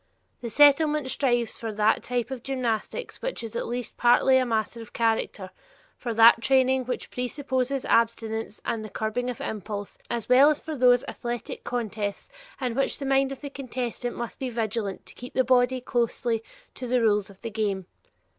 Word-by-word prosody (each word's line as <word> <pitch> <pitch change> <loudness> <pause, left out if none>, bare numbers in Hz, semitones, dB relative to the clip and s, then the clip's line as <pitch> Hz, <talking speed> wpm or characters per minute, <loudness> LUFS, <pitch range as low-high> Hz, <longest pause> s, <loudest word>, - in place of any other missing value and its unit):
The 235 - -4
Settlement 290 +2 +4
strives 240 -4 0
for 225 -1 -4
that 210 +1 +2
type 245 0 -2
of 260 -3 -5
gymnastics 255 - -3
which - - -3
is 225 - -7
at - - -2
least 240 0 -4
partly 245 +2 +5
a 255 - 0
matter 225 0 -1
of 225 - -12
character, 220 -4 -1 0.4
for 240 - -4
that 230 +1 +7
training 260 0 +3
which 250 - -4
presupposes 260 +1 -2
abstinence 225 -1 0
and 225 -2 -2
the 215 - -7
curbing 220 +5 -2
of 245 - -5
impulse, 205 -1 -5
as 235 -3 -3
well 260 +4 +7
as 300 - +1
for 315 -1 -6
those 250 -1 +5
athletic 240 -2 -5
contests 215 - -3 0.3
in 250 -3 -1
which 275 +3 +1
the 280 - -5
mind 270 0 +2
of 275 - -7
the 285 -2 -6
contestant 250 -3 -4
must 235 -1 -6
be 260 - -2
vigilant 220 -4 -3
to - - -11
keep 245 - -10
the 260 - +4
body 255 0 +3
closely 235 -2 -1 0.3
to 255 - -6
the 250 +1 +2
rules 210 -3 +2
of 195 - -16
the 230 - -4
game. 200 -3 -1
240 Hz, 185 wpm, -26 LUFS, 225-260 Hz, 0.4 s, that